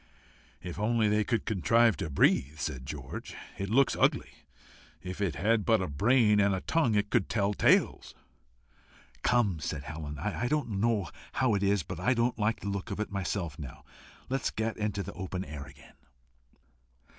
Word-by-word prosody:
"If 90 +1 -6
only 110 +1 +2
they 105 0 +2
could 115 +1 -1
contrive 115 +3 +3
to 80 - -3
breathe," 70 +1 +2
said 70 -3 -4
George. - - -7 0.2
"It 100 0 -3
looks 135 +5 +3
ugly. - - +1 0.7
If 90 +2 -6
it 90 -8 0
had 110 +8 +2
but 110 0 +3
a 95 - -2
brain 105 - +3
and 100 -1 +3
a 95 - -4
tongue 155 -10 +1
it 105 0 0
could 115 -6 +1
tell 105 -2 +1
tales." - - +2 1.1
"Come," 105 -9 +2
said 70 -1 -4
Helen. 75 0 -6
"I 105 - -2
don't 120 -8 -1
know 110 -4 +1 0.3
how 130 -4 +2
it 100 - +1
is, 100 -2 +2
but 90 +1 -7
I 125 +8 +2
don't 120 0 0
like 110 +2 0
the 100 - -3
look 100 -1 -4
of - - -4
it 105 - -3
myself 95 -6 -3
now. 70 -5 -9 0.4
Let 135 0 -1
us - - 0
get 110 +1 -2
into 105 -2 -2
the - - -7
open 95 0 -5
air 75 -2 -7
again." 70 +2 -16
100 Hz, 180 wpm, -30 LUFS, 85-115 Hz, 1.1 s, contrive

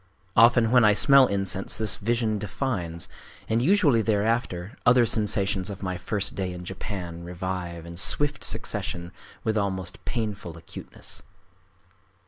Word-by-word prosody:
Often 115 0 +5
when 125 -1 +6
I 105 -1 +5
smell 135 +4 +6
incense, 95 -1 -1
this 105 -2 +1
vision 110 0 0
defines; 95 -6 -3 0.4
and 115 +1 +1
usually 150 - +4
thereafter 110 -1 -1
other 125 -2 +5
sensations 100 -3 +1
of 100 -1 -7
my 95 -1 -2
first 100 +3 -2
day 95 -2 -3
in 90 0 -8
Japan 90 -3 -6
revive 90 -1 -5
in 85 0 -9
swift 145 +10 +1
succession 85 0 -1 0.3
with 110 0 0
almost 95 -3 -4
painful 105 -8 -4
acuteness. 80 - -8
100 Hz, 130 wpm, -25 LUFS, 90-115 Hz, 0.4 s, when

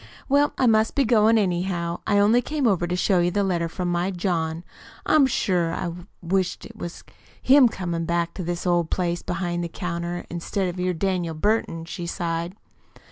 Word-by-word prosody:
Well, 285 +1 +3
I - - +2
must 220 -1 +3
be 275 - +3
goin', 225 -1 +4
anyhow. 175 -3 -1
I 205 - +3
only 215 +4 +4
came 290 +2 -2
over 185 -6 +2
to 175 - -1
show 180 0 +2
you 175 0 +2
the 200 +3 0
letter 170 -3 0
from 175 +1 -3
my 175 +2 0
John. 170 -3 -2 0.4
I'm 295 -3 +5
sure 175 -8 0
I 170 -2 -3 0.3
wish't 185 +1 -1
was 175 -5 -7 0.4
him 265 -2 +6
comin' 170 -5 -3
back 170 0 0
to 185 - -5
his 175 +1 -3
old 175 -2 +1
place 175 -2 -1
behind 175 -1 -2
the 170 - -4
counter 175 0 -4
instead 180 +2 -2
of 175 +1 -6
your 180 0 0
Daniel 175 -2 -1
Burton," 165 -2 0
she 175 0 -6
sighed. 170 0 -3
180 Hz, 185 wpm, -24 LUFS, 170-205 Hz, 0.4 s, him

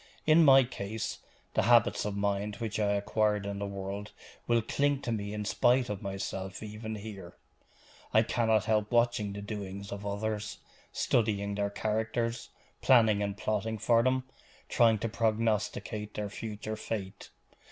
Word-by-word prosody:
In 160 +2 +6
my 135 -2 +8
case, 110 -3 -5 0.3
the - - +3
habits 120 -1 +4
of 100 -1 -3
mind 100 +1 -1
which 110 0 -3
I 105 -1 +2
acquired 105 0 +1
in 100 0 -4
the 100 - -2
world 100 +1 -6 0.3
will 115 -1 +3
cling 145 +4 +1
to 120 - -2
me 100 -2 -2
in 105 0 -4
spite 125 +4 +3
of 100 - -5
myself 95 0 -5
even 110 +1 -6
here. 100 -4 -9 0.7
I 110 - +5
cannot 110 -3 +2
help 105 -1 +1
watching 120 -3 +2
the 100 0 -6
doings 100 -1 -6
of 100 0 -6
others, 105 +1 -3 0.3
studying 100 -3 +1
their 100 0 -1
characters, 110 +3 -2 0.3
planning 110 -5 +5
and 100 -1 -2
plotting 110 +1 -1
for 115 +2 +3
them, 130 +1 +1 0.5
trying 115 -2 +4
to 115 - -2
prognosticate 110 -1 -1
their 105 -1 -3
future 110 0 -5
fate. 105 -3 -5
105 Hz, 150 wpm, -30 LUFS, 100-115 Hz, 0.7 s, my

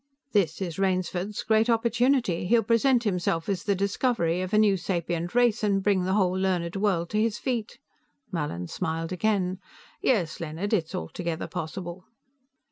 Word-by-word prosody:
This 195 -4 +1
is 170 -1 -5
Rainsford's 185 +1 -1
great 220 +1 +3
opportunity; 235 -5 +2
he 235 - +4
will 230 - +3
present 240 +1 +3
himself 180 -5 0
as 195 -3 -1
the 200 - +2
discoverer 195 -3 0
of 185 - -5
a 215 - +3
new 210 -2 +5
sapient 175 0 -2
race 240 -3 +3
and 195 -2 +2
bring 190 -3 +2
the 190 - 0
whole 190 -4 +3
learned 185 -2 0
world 195 -4 0
to 215 - +1
his 225 0 0
feet." 240 -4 -3 0.5
Mallin 145 - -3
smiled 165 - -3
again. 185 -1 0 0.4
"Yes, 180 -11 +1
Leonard, 165 +6 -3
it 180 -7 +2
is - - -7
altogether 165 - -4
possible." 175 +2 -6
190 Hz, 165 wpm, -27 LUFS, 170-215 Hz, 0.5 s, new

